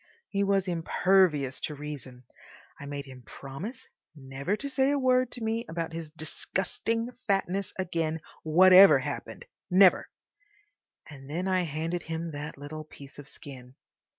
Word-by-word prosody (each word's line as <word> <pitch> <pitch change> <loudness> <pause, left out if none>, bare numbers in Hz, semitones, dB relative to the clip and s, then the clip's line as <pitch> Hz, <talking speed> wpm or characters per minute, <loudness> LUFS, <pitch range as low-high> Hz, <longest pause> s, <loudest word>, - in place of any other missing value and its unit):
He 200 0 0
was 195 -1 +1
impervious 170 -5 +2
to 150 - -4
reason. 140 -4 -8 0.6
I 145 - -8
made 140 0 -5
him 130 -2 -12
promise 140 - -8 0.3
never 140 +6 -3
to 280 - -6
say 270 0 +1
a 285 - +2
word 255 -2 +3
to 240 - -5
me 225 +1 -1
about 165 0 -4
his 165 -1 -6
disgusting 190 +8 -3 0.2
fatness 195 -1 0
again 165 -3 -2 0.2
whatever 185 +4 +8
happened—never, 195 - +1 1.0
and 135 -2 -12
then 175 +5 -2
I 185 -1 +1
handed 165 +3 -3
him 165 +1 -5
that 145 0 -7
little 150 +2 -7
piece 145 -2 -14
of 145 - -10
skin. 130 -3 -12
165 Hz, 140 wpm, -28 LUFS, 145-195 Hz, 1.0 s, whatever